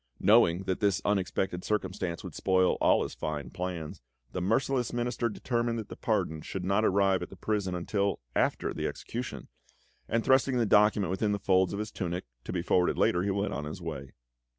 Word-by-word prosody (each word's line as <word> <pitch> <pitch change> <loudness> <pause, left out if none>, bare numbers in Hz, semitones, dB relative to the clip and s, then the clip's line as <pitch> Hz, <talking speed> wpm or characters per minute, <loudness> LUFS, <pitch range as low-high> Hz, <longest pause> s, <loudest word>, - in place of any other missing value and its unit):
Knowing 95 -4 +5
that 95 -1 -2
this 100 -3 +2
unexpected 95 -2 0
circumstance 95 -4 -2
would - - -7
spoil 95 -1 +2
all - - +4
his - - -5
fine 75 -5 -4
plans, 90 -4 -5 0.3
the 90 - -3
merciless 120 +5 +1
Minister 120 0 -1
determined 120 +1 -1
that 110 - -6
the - - -7
pardon 80 -1 -1
should 90 +3 -5
not 100 +3 +2
arrive 95 -2 +3
at - - -5
the - - -11
prison 100 -1 -1
until 100 +3 -1 0.2
after - - +1
the - - -2
execution, 120 +2 -6 0.6
and 115 0 +1
thrusting 130 0 +4
the 120 - +2
document 105 -3 +4
within 105 +2 0
the - - 0
folds 95 -2 +2
of 100 - -3
his 105 +1 -4
tunic, 90 -1 -3 0.2
to - - -4
be 90 -2 -2
forwarded 90 0 +2
later, 90 - +3
he 100 - -1
went 100 +1 -1
on 75 - -3
his 75 +5 -6
way. 70 -7 -6
95 Hz, 195 wpm, -29 LUFS, 90-110 Hz, 0.6 s, Knowing